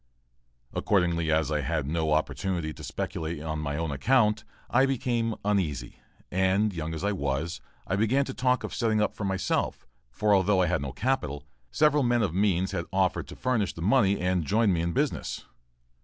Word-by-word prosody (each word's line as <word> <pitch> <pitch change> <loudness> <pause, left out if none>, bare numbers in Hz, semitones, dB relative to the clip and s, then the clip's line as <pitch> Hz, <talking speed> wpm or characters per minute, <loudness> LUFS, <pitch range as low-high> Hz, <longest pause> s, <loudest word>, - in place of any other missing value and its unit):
Accordingly, 85 -5 +1
as 80 0 +1
I 75 -1 +1
had 75 +1 -1
no 80 +1 -1
opportunity 80 +2 -1
to - - -11
speculate 80 0 -4
on 80 0 -4
my 75 -1 -3
own 80 -2 -2
account, 105 - +2 0.2
I 130 +3 +3
became 120 -4 0
uneasy, 95 -10 -1 0.3
and, 95 +3 +2
young 80 -1 -4
as 80 - -5
I 100 - +1
was, 75 -1 -2 0.2
I 95 - -1
began 125 +7 +2
to 130 - -5
talk 125 0 +1
of - - -5
setting 110 -2 +1
up 105 - +1
for 105 - -5
myself; 95 -1 -1 0.2
for, 105 +12 +1
although 95 -1 +3
I - - +3
had 90 -2 0
no 70 -1 -4
capital, 75 - -2 0.2
several 150 -1 +3
men 120 -2 +2
of 90 -6 -1
means 95 -1 +1
had 85 - -2
offered 95 -1 +1
to - - -9
furnish 115 -6 0
the 80 - -6
money 100 -2 +3
and 90 -1 +1
join 105 +5 +2
me 85 - 0
in 85 0 -1
business. - - -2
95 Hz, 185 wpm, -27 LUFS, 80-110 Hz, 0.3 s, I